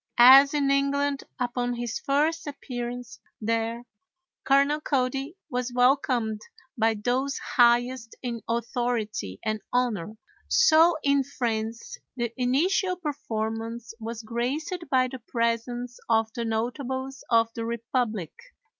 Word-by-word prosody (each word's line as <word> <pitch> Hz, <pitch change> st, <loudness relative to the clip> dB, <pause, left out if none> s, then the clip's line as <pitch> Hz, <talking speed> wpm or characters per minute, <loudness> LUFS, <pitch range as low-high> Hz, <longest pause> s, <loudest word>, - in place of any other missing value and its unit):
As 270 Hz, +4 st, +9 dB
in 280 Hz, -2 st, +2 dB
England 280 Hz, 0 st, +1 dB, 0.2 s
upon 245 Hz, 0 st, -1 dB
his 240 Hz, -2 st, -3 dB
first 310 Hz, +3 st, 0 dB
appearance 245 Hz, -3 st, -6 dB, 0.2 s
there 230 Hz, +2 st, -1 dB, 0.6 s
Colonel 280 Hz, +2 st, +3 dB
Cody 270 Hz, +3 st, -1 dB
was 250 Hz, 0 st, -2 dB
welcomed 245 Hz, -4 st, +2 dB, 0.3 s
by 225 Hz, -1 st, +2 dB
those 250 Hz, +6 st, -1 dB
highest 240 Hz, -1 st, +2 dB
in 235 Hz, -2 st, -3 dB
authority 230 Hz, -, -2 dB
and 215 Hz, -1 st, -1 dB
honor, 220 Hz, -5 st, -1 dB, 0.3 s
so 335 Hz, -7 st, +5 dB
in 280 Hz, -1 st, +3 dB
France 230 Hz, -4 st, -3 dB, 0.2 s
the 235 Hz, -1 st, -2 dB
initial 325 Hz, +9 st, +1 dB
performance 230 Hz, -7 st, -4 dB
was 225 Hz, 0 st, -6 dB
graced 245 Hz, +9 st, -2 dB, 0.2 s
by 255 Hz, -1 st, +3 dB
the 260 Hz, 0 st, -8 dB
presence 235 Hz, +1 st, -2 dB
of 225 Hz, -1 st, +2 dB
the 235 Hz, -2 st, -3 dB
notables 260 Hz, +4 st, -3 dB
of 230 Hz, -1 st, +3 dB
the 230 Hz, -, -4 dB
republic. 230 Hz, -, -2 dB
245 Hz, 115 wpm, -26 LUFS, 230-270 Hz, 0.6 s, As